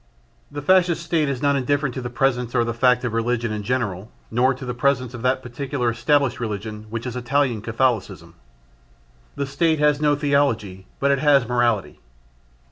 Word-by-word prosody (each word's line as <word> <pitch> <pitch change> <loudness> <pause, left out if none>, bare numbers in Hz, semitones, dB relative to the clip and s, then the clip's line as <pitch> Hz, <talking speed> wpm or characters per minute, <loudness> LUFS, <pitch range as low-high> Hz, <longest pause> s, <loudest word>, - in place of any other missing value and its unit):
The 145 0 -7
Fascist 175 0 +3
State 160 -3 0
is 135 0 -3
not 140 0 +3
indifferent 140 0 0
to 130 - -5
the 120 - -5
presence 125 -1 0
or 120 - +3
the 115 0 -2
fact 125 +1 +3
of 120 -2 -2
religion 115 0 -1
in 105 -1 -3
general 105 -4 -2 0.2
nor 125 +3 +3
to 130 - -9
the 125 - -3
presence 130 0 0
of 120 - -7
that 130 +1 0
particular 125 0 -2
established 140 +3 +1
religion, 110 -1 -5
which 115 +2 -5
is 125 -1 -5
Italian 125 -2 0
Catholicism. 110 - -1 1.0
The 140 - -2
State 155 +4 +1
has 150 0 +2
no 150 -1 +3
theology, 115 - 0
but 140 0 +2
it 140 - +2
has 140 -4 +4
morality. 120 -4 0
125 Hz, 180 wpm, -22 LUFS, 115-140 Hz, 1.0 s, has